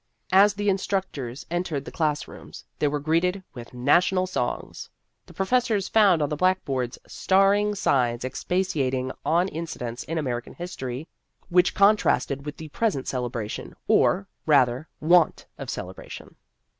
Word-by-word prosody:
As 200 +2 +6
the 205 0 -2
instructors 190 -10 -2
entered 170 -5 -2
the - - -8
class 150 -2 -1
rooms, - - -12
they 150 - +2
were 145 +1 -1
greeted 170 +6 0
with 120 -3 -10
national 175 +9 +2
songs. 185 - -4 0.4
The - - -14
professors 215 -1 +1
found 195 -8 +4
on 145 - -1
the 150 - -2
blackboards 140 -8 0
star 195 +1 +3
ing 205 0 0
signs 125 -8 +1
expatiating 135 -4 -1
on 175 +3 +2
incidents 125 -9 -5
in 165 - -3
American 125 -5 -3
history 145 -5 -6 0.4
which 180 0 +3
contrasted 195 -8 +2
with 145 - -6
the 160 -1 -9
present 185 - -1
celebration, 120 -4 -4
or, 195 +2 +3 0.2
rather, 130 -1 +3
want 170 +1 +3
of - - -6
celebration. - - -8
160 Hz, 140 wpm, -25 LUFS, 130-190 Hz, 0.4 s, As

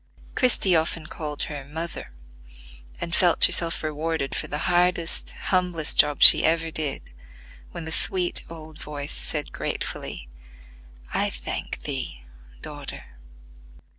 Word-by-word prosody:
Christie 220 -7 +3
often 160 0 -1
called 150 -2 -5
her 145 -2 -6
"Mother," 160 - -7 0.9
and 170 - -5
felt 175 -2 +5
herself 165 -1 +5
rewarded 155 -2 -3
for - - -3
the 145 - -3
hardest, 175 -2 0 0.2
humblest 180 -4 +1
job 145 -1 +4
she - - +10
ever 165 0 +1
did 150 - -4 0.6
when 165 - -8
the 160 - -6
sweet 180 +2 0
old 160 -1 -11
voice 145 -1 -6
said 150 -2 -3
gratefully, 60 - -5 0.9
"I - - +1
thank - - -6
thee, 130 - -5 0.4
daughter." - - -8
160 Hz, 120 wpm, -24 LUFS, 150-170 Hz, 0.9 s, she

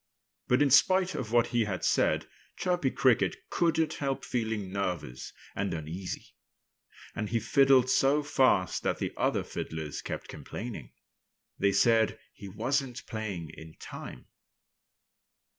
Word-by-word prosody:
But 125 +4 +4
in 140 - +2
spite 185 +6 +5
of 110 -4 -4
what 120 0 +4
he 120 -2 +3
had 95 -3 -3
said - - +2 0.3
Chirpy 180 -6 +1
Cricket 115 -8 +2 0.2
couldn't 165 -2 +1
help 135 -2 -3
feeling 110 -5 -2
nervous 90 -10 -3 0.2
and 100 -3 -1
uneasy. 80 +4 -6 0.8
And 105 -1 -3
he 115 +2 +1
fiddled 135 +2 +4
so 135 +3 +3
fast 130 - +2
that - - 0
the - - -3
other - - +1
fiddlers 80 -2 -5
kept - - -5
complaining. 120 -1 -7 0.7
They 100 - +3
said 115 0 +3 0.2
he 100 - -10
wasn't 130 +5 -2
playing 100 -7 -5
in 80 0 -12
time. - - -9
115 Hz, 130 wpm, -29 LUFS, 95-135 Hz, 0.8 s, spite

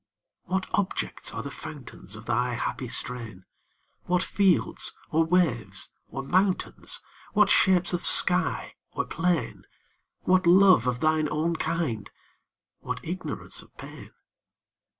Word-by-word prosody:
What 190 +1 -1
objects 205 -4 -2
are 115 - -5
the 140 - -6
fountains 135 -11 -9
Of 110 +1 -11
thy 120 +1 0
happy 125 +2 -4
strain? 115 -7 -2 0.6
What 180 0 +1
fields, 195 -3 +1
or 165 +1 +3
waves, 125 - 0 0.2
or 135 - -6
mountains? 185 +5 0 0.3
What 210 -2 +4
shapes 185 -1 +3
of 175 - -2
sky 180 0 +5 0.2
or - - -2
plain? 170 -1 -2 0.5
What 185 -1 +2
love 185 -7 +6
of 125 0 -1
thine 155 -1 +1
own 160 +3 -1
kind? 160 -10 -3 0.7
what - - -5
ignorance 185 +3 -6
of - - -21
pain? - - -11
160 Hz, 125 wpm, -26 LUFS, 125-180 Hz, 0.7 s, love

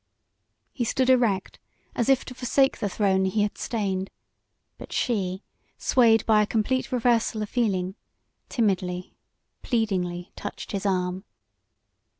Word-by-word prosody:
He 245 - -2
stood 260 +3 +2
erect 225 -7 +1 0.3
as 235 - 0
if 270 -1 +3
to - - -8
forsake 265 +2 +1
the 205 - -1
throne 190 -1 +2
he 205 +3 +1
had 205 - -2
stained, 195 -4 -2 0.7
but - - -10
she, 190 -5 -1 0.3
swayed 225 -4 +4
by 215 -1 +5
a 210 - +1
complete 255 +5 0
reversal 230 -3 +1
of 210 - -6
feeling, 195 -6 0 0.6
timidly, 185 -5 -1 0.5
pleadingly 185 -7 -1
touched 205 - -7
his 200 0 -2
arm. 185 0 -1
210 Hz, 130 wpm, -26 LUFS, 190-240 Hz, 0.7 s, by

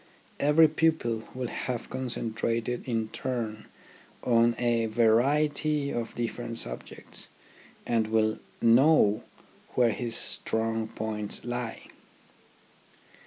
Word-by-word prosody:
Every 150 +3 +6
pupil 155 -8 0
will 125 -2 -3
have 125 -3 -4
con 130 0 -3
centrated 115 +1 -2
in 115 -3 -1
turn 115 -4 -4 0.6
on 115 -1 +3
a 120 -2 +1
variety 140 +6 +2
of 115 -1 -4
different 120 0 -4
subjects, - - -2 0.6
and 115 -2 +1
will 110 0 +1 0.2
know 115 -2 +5 0.5
where 120 -2 +4
his 115 +1 -2
strong 110 0 +1
points 105 -1 -4
lie. 120 -1 -4
115 Hz, 100 wpm, -28 LUFS, 110-130 Hz, 0.6 s, Every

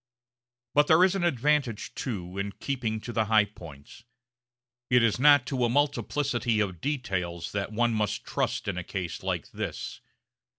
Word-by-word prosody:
But 145 0 +4
there 160 +2 +6
is 185 0 +4
an 195 -3 -1
advantage, 145 -6 +1
too, 95 -7 -5
in 100 0 -3
keeping 120 -5 -3
to 120 - -6
the 110 -1 +1
high 110 -1 +4
points. 80 -2 -13 0.9
It 125 -2 +5
is 115 0 +2
not 145 -2 +6
to 130 -1 -1
a 120 - +3
multiplicity 140 -3 0
of 95 -5 -2
details 90 - -2
that 100 +1 -3
one 120 +2 +1
must 105 -1 -1
trust - - -2
in 95 -3 -2
a - - -5
case 90 -1 -5
like - - -3
this. - - -5
115 Hz, 165 wpm, -28 LUFS, 100-140 Hz, 0.9 s, there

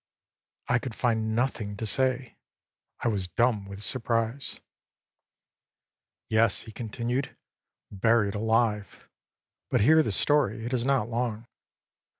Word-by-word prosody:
â - - +1
I 120 - +4
could 120 -2 -6
find 110 -2 0
nothing 110 -4 -1
to 110 - -4
say, 130 +2 +1 0.7
I - - 0
was 100 -5 0
dumb 105 +3 +1
with 100 +1 -8
surprise. 115 +2 -1 1.7
âYes,â 110 -1 +3
he 110 - -10
continued, 120 +4 -3 0.6
âburied 105 0 +2
alive; 110 -2 0 0.6
but - - +2
hear 160 +8 +6
the 130 - -1
story, 115 -2 +2
it 120 - -4
is 120 -1 +1
not 135 -5 +2
long. 115 -1 -2
115 Hz, 125 wpm, -27 LUFS, 105-125 Hz, 1.7 s, hear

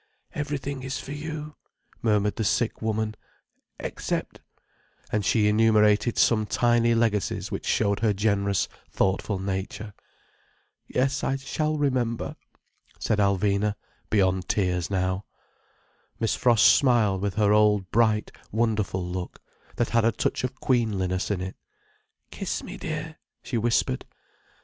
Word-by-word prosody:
"Everything 140 -2 -3
is 135 +1 -4
for 135 - -8
you," 150 0 -6 0.4
murmured 105 -2 +2
the 110 - 0
sick 110 +2 0
woman—"except—" 110 -1 -5 0.7
and 105 - 0
she 105 +2 +3
enumerated 105 +1 +4
some 110 -2 +3
tiny 120 0 +3
legacies 110 -4 0
which - - -4
showed 100 -2 +1
her 110 0 +2
generous, 100 -1 +1 0.2
thoughtful 95 +1 0
nature. 95 +2 -4 0.9
"Yes, 135 +2 0
I 135 - +1
shall 155 +3 -2
remember," 125 -5 -1 0.6
said 105 - 0
Alvina, 100 +1 +2 0.3
beyond 95 -3 +1
tears 90 -4 0
now. 95 0 -1 0.9
Miss 115 - +1
Frost 120 -3 +4
smiled 110 -8 +3
with 100 -2 -2
her 105 -1 +3
old 105 -3 +3
bright, 110 -2 +2 0.2
wonderful 105 -5 0
look, 90 0 -5 0.4
that 120 - 0
had 115 -1 +2
a 115 - +4
touch 110 - -1
of 130 +1 -2
queenliness 100 -7 0
in 100 -3 -1
it. 95 0 -5 0.8
"Kiss - - -3
me, - - -7
dear," 155 0 -5 0.2
she 125 - -4
whispered. 115 - +1
110 Hz, 125 wpm, -26 LUFS, 100-120 Hz, 0.9 s, enumerated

